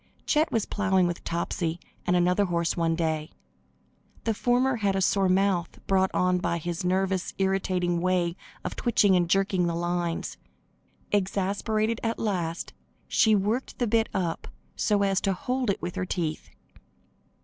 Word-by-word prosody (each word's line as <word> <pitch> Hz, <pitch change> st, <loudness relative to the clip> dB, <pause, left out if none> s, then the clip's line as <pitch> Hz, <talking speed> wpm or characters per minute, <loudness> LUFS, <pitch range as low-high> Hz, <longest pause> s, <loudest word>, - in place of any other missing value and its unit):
Chet 310 Hz, +1 st, +2 dB
was 225 Hz, -3 st, +1 dB
plowing 190 Hz, -3 st, +2 dB
with 175 Hz, 0 st, -3 dB
Topsy 170 Hz, 0 st, -2 dB, 0.3 s
and 180 Hz, -, +3 dB
another 180 Hz, +3 st, +3 dB
horse 170 Hz, -2 st, 0 dB
one 165 Hz, -1 st, +1 dB
day. 160 Hz, -1 st, -1 dB, 0.9 s
The 225 Hz, -, +1 dB
former 245 Hz, +3 st, +2 dB
had 200 Hz, -3 st, +1 dB
a -, -, +1 dB
sore 195 Hz, 0 st, +2 dB
mouth, 185 Hz, -2 st, +1 dB
brought 190 Hz, -1 st, +3 dB
on 180 Hz, 0 st, +2 dB
by 170 Hz, -, -1 dB
his 170 Hz, +1 st, -4 dB
nervous 190 Hz, 0 st, 0 dB
irritating 185 Hz, -2 st, 0 dB
way 180 Hz, -2 st, +1 dB, 0.3 s
of -, -, -3 dB
twitching 205 Hz, -5 st, +3 dB
and 175 Hz, -2 st, +2 dB
jerking 190 Hz, -1 st, +2 dB
the 170 Hz, -, -1 dB
lines. 175 Hz, 0 st, -2 dB, 0.7 s
Exasperated 205 Hz, +3 st, 0 dB
at 225 Hz, 0 st, -1 dB
last, 175 Hz, -6 st, -2 dB, 0.3 s
she 220 Hz, -1 st, +4 dB
worked 210 Hz, +6 st, -1 dB
the 245 Hz, -, +1 dB
bit 225 Hz, 0 st, +2 dB
up 175 Hz, -4 st, -2 dB, 0.3 s
so 205 Hz, -2 st, +2 dB
as 195 Hz, -1 st, +1 dB
to 195 Hz, -, +1 dB
hold 250 Hz, +5 st, -2 dB
it 200 Hz, -, -1 dB
with 175 Hz, -, -3 dB
her 185 Hz, -, -2 dB
teeth. 160 Hz, -4 st, -3 dB
185 Hz, 155 wpm, -27 LUFS, 175-205 Hz, 0.9 s, she